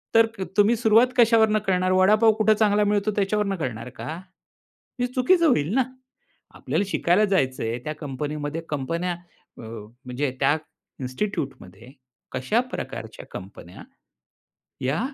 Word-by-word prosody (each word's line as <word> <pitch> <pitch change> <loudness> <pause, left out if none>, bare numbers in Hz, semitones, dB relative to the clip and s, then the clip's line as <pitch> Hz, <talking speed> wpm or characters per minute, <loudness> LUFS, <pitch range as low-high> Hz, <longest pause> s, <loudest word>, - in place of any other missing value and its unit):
तर 225 0 +7
क - - -1
तुम्ही 205 +3 +5
सुरुवात 225 +2 +5
कशावरून 220 -2 +5
करणार 185 0 +2
वडापाव 210 +4 +5
कुठं 215 0 +3
चांगला 210 -1 +4
मिळतो 205 0 +1
त्याच्यावरून 205 0 0
करणार 125 -6 -4
का? - - -9 0.9
हे 245 - +1
चुकीचं 255 +8 +3
होईल 175 - +2
ना, 265 - +4 0.7
आपल्याला - - -1
शिकायला 190 +1 +2
जायचं 135 - 0
आहे, 115 +2 -2
त्या 155 - -3
कंपनीमध्ये 145 +2 -4
कंपन्या 165 +5 -2 0.5
अ, - - -10
म्हणजे 125 +5 -5
त्या 140 +2 +3 0.4
इन्स्टिट्यूटमध्ये 130 - -5 0.4
कशा 130 - 0
प्रकारच्या - - -6
कंपन्या 95 -2 -10 1.0
या 135 +5 0
180 Hz, 125 wpm, -24 LUFS, 130-215 Hz, 1.0 s, तर